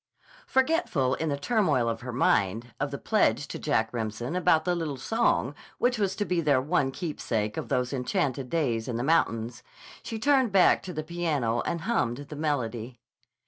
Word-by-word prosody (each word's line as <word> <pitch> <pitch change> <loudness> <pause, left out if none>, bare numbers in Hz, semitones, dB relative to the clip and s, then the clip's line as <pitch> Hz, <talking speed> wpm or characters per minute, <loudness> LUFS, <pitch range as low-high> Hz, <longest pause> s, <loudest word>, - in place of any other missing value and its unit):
Forgetful, 260 - +1
in 160 +2 -1
the 140 - -1
turmoil 150 - +1
of 115 -1 -2
her 125 +1 -5
mind, 115 -1 +1
of 145 - -1
the 140 - -5
pledge 145 - +1
to - - -5
Jack 115 -7 0
Remsen 115 +5 -3
about 160 -3 +3
the 180 - +2
little 160 -5 -3
song 145 - +1 0.2
which 245 -1 +1
was 195 -2 0
to 205 - -1
be 180 -1 0
their 145 -4 +3
one 145 0 +1
keepsake 115 - -3
of - - -5
those 125 +1 0
enchanted 135 -1 -1
days 120 -9 0
in 125 - -3
the 120 - -2
mountains, 120 -6 +1 0.4
she 225 - -5
turned 265 -1 +3
back 190 -2 +5
to 185 - -7
the 155 -1 -3
piano 150 -9 -1
and 170 - -2
hummed 160 - 0
the 150 - -7
melody. 125 -6 -2
145 Hz, 185 wpm, -27 LUFS, 120-175 Hz, 0.4 s, back